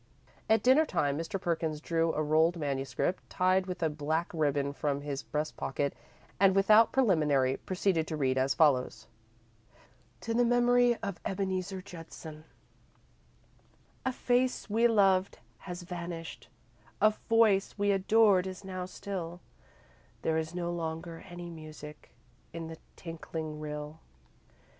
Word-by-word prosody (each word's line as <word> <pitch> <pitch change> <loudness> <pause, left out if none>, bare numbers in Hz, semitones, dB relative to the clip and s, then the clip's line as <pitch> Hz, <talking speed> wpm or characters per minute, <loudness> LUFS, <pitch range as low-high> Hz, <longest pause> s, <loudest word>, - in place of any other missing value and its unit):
At 220 -1 +4
dinner 265 +5 +6
time, 140 - 0
Mr. 165 +5 -3
Perkins 160 -3 -1
drew 165 +1 0
a 155 - 0
rolled 160 +3 +3
manuscript, 140 +4 -2
tied 185 0 +2
with 180 -2 -4
a - - +4
black 155 +3 -2
ribbon, 145 -3 0
from 145 -1 -2
his 145 -1 -4
breast 150 +1 -3
pocket, 140 +1 -2 0.5
and, 195 -1 +5
without 215 +3 +6
preliminary, 150 - +2
proceeded 180 -3 0
to 155 - -3
read 130 -3 +1
as 130 +1 +1
follows: 130 -7 +2 1.1
TO 230 - -3
THE 240 +1 +3
MEMORY 245 0 +4
OF 200 -5 -4
EBENEEZER 190 -1 -2
JUDSON 160 -3 -10 1.6
A 260 - 0
face 250 0 0
we 225 +2 +3
loved 195 -4 +3 0.2
has 180 -1 -7
vanished, 170 -1 -7 0.5
A 215 - +5 0.2
voice 220 -4 +4
we 205 0 +2
adored 195 -1 +4
is 185 +1 -7
now 185 -1 -4
still, 180 -3 -6 0.8
There 160 0 +1
is 160 +2 -5
no 175 -1 -2
longer 165 0 -5
any 175 0 -8
music 155 -2 -10 0.4
In 165 -1 -6
the 160 - -9 0.2
tinkling 160 -2 -6
rill. 150 +1 -6
170 Hz, 135 wpm, -30 LUFS, 155-195 Hz, 1.6 s, dinner